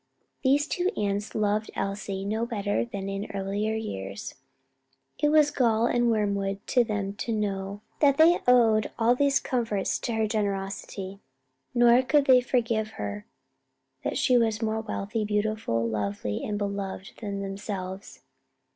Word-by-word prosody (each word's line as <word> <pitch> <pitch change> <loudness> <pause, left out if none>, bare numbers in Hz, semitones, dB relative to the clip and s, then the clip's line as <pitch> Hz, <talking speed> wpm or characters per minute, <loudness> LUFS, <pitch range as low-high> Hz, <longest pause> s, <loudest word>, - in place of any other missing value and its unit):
These 280 +2 +4
two 355 +4 0
aunts 205 0 -2
loved 215 0 0
Elsie 195 -1 -3
no 220 +3 -1
better 205 -4 -1
than 200 -5 -5
in 195 +1 -4
earlier 200 +3 -1
years: 100 - -5 0.9
it 295 - +3
was 300 -1 +5
gall 230 -5 +2
and 240 0 +2
wormwood 200 -3 0
to 245 - +4
them 205 -3 -2
to 230 - -3
know 200 -2 -2 0.2
that 280 -2 +4
they 330 +2 +6
owed 225 -4 +5
all 235 +1 +4
these 280 +2 +3
comforts 225 -6 -1
to 235 - -3
her 220 0 +1
generosity; 195 -2 -3 0.6
nor 240 +1 +6
could 285 +2 +3
they 255 -2 +6
forgive 230 -3 0
her 205 +1 -5 0.8
that - - -1
she 250 -1 +4
was 220 -2 +1
more 220 0 -1
wealthy, 215 0 -3
beautiful, 210 - 0
lovely 105 -1 -2
and 210 - -2
beloved 200 -1 -4
than 200 -2 -4
themselves. 195 -1 -6
215 Hz, 145 wpm, -27 LUFS, 195-235 Hz, 0.9 s, they